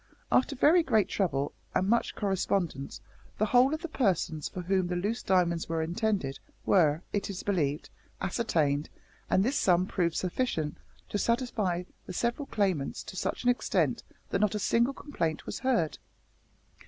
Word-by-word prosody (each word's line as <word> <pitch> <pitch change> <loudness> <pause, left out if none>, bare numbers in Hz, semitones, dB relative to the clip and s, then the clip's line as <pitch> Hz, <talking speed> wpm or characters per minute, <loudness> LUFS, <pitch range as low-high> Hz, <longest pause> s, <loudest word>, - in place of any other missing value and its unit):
After 275 +2 +3
very 315 +7 +5
great 220 - +2
trouble, 145 -8 0 0.2
and 185 - +2
much 235 +3 +1
correspondence, 190 -7 -1 0.4
the 215 - +2
whole 250 +4 +5
of 310 +2 -3
the - - -2
persons 185 - 0
for 180 - -5
whom 185 0 +1
the 180 - -2
loose 205 +7 -1
diamonds 170 -3 +1
were 165 -1 0
intended 175 -5 -1 0.3
were, 160 -3 +3
it 205 - -1
is 195 -2 -5
believed, 155 -7 -1 0.3
ascertained, 160 -8 0 0.4
and 190 +2 +3
this 270 +4 +1
sum 180 -1 +3
proved 170 -4 0
sufficient 175 -6 -1 0.3
to 205 - -1
satisfy 220 -7 0 0.2
the 185 - -5
several 240 +8 -1
claimants 190 -10 -1
to - - -9
such - - -2
an 245 - +5
extent 245 - 0 0.3
that - - +1
not 210 0 +2
a - - +1
single 235 +6 +2
complaint 165 - -3
was - - -5
heard.'" 240 - +1
190 Hz, 160 wpm, -29 LUFS, 170-235 Hz, 0.4 s, very